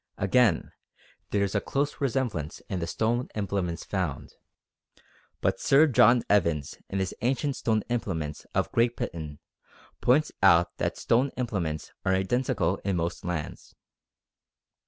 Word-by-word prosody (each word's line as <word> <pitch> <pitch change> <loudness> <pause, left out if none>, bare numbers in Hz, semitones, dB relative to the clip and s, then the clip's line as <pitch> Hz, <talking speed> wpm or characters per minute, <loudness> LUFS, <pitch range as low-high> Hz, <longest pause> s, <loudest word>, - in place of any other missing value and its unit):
Again, 100 -2 +2 0.6
there 100 -1 +1
is 100 - -1
a 100 - +1
close 140 +1 -2
resemblance 120 - -1
in 95 - -2
the 85 - -3
stone 115 +7 0
implements 100 -5 -2
found; 90 -9 -3 1.1
but 95 0 +1
Sir 140 +3 +5
John 120 -3 +5
Evans 85 -8 +1
in 95 - -3
his 95 -1 -1
Ancient 135 +3 0
Stone 110 -4 0
Implements 85 -11 -3
of - - 0
Great 120 +1 +2
Britain 75 -3 -5 0.6
points 150 +5 +3
out 85 -3 +5
that - - -1
stone 125 +4 +2
implements 95 - -3
are 95 - +2
identical 120 +7 0
in 100 -1 -2
most 85 0 -2
lands. 85 -4 -5
100 Hz, 135 wpm, -27 LUFS, 85-120 Hz, 1.1 s, Sir